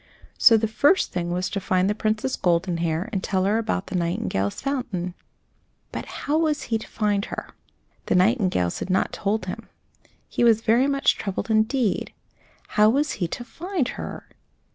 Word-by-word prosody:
So 225 - +8
the 220 0 0
first 285 - +3
thing 175 -1 -2
was 180 +1 -1
to 200 - -1
find 185 0 +1
the 205 - +2
Princess 215 +4 -1
Goldenhair 170 0 0
and 190 - -1
tell 190 -2 0
her 210 +3 +2
about 215 -4 -2
the 185 - -6
nightingales' 170 - -1
fountain. 235 -11 -3 0.8
But - - -5
how 300 +2 -1
was 305 -4 +1
he 225 - +2
to - - -10
find 205 -2 0
her? - - -6 0.6
The - - +2
nightingales 185 - +2
had - - -5
not 185 - +1
told 205 0 -1
him. 185 - -7 0.6
He - - -1
was 225 -2 +5
very 235 +4 +3
much 275 -1 +2
troubled, 195 +2 -3
indeed. 220 +1 +1 0.6
How 210 0 +5
was 285 +4 +1
he 175 - +2
to 240 - -5
find 325 - -3
her? - - -7
210 Hz, 170 wpm, -24 LUFS, 185-240 Hz, 0.8 s, So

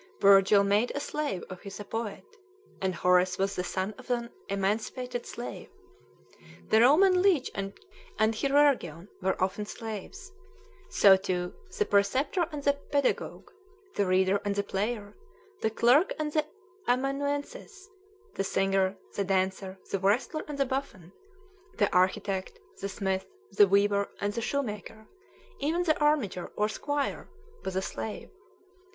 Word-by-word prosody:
Virgil 200 0 +6
made 205 +4 +2
a - - 0
slave 290 -10 -3
of 185 -1 -9
his 200 0 -8
a 205 - -6
poet, 225 0 -5 0.6
and 190 -1 0
Horace 180 +1 +3
was 195 +1 0
the 180 - -1
son 190 +3 -2
of - - -13
an 235 -1 -1 0.2
emancipated 220 +5 -2
slave. 240 - -7 1.0
The 220 - +5
Roman 360 +9 +6
leech 360 -9 +3
and 195 0 -4 0.4
chirurgeon 220 - +2
were 190 +1 0
often 195 +3 -1
slaves; 225 - -7 0.6
so, 195 -1 +7
too, 185 -2 -2 0.2
the 425 - +2
preceptor 265 - +2
and 295 -2 -5
the 285 - +4
pedagogue, 280 -1 -2 0.4
the 200 - 0
reader 190 +2 +3
and 205 -1 -1
the 200 - 0
player, 205 +1 -3 0.5
the 220 - +2
clerk 245 - +4
and 305 -1 -2
the 305 -1 +1 0.4
amanuensis, 285 - -2 0.5
the - - -1
singer, 195 0 +1 0.2
the 200 - -1
dancer, 190 0 -1
the 195 - 0
wrestler, 220 - +1
and 295 -1 -5
the 275 - +2
buffoon, 250 -10 -5 0.6
the 205 - +2
architect, 190 +1 +1 0.2
the 200 - -3
smith, 190 -1 -2 0.2
the 205 - +6
weaver, 200 +1 +2
and 205 0 -1
the 235 - -3
shoemaker; 220 -4 -4 0.5
even 320 +5 0
the 315 -3 +1
armiger 290 - +1
or 210 - +2
squire 290 +6 -3 0.3
was 190 - -4
a 190 - 0
slave. 215 - -6
210 Hz, 140 wpm, -29 LUFS, 195-275 Hz, 1.0 s, so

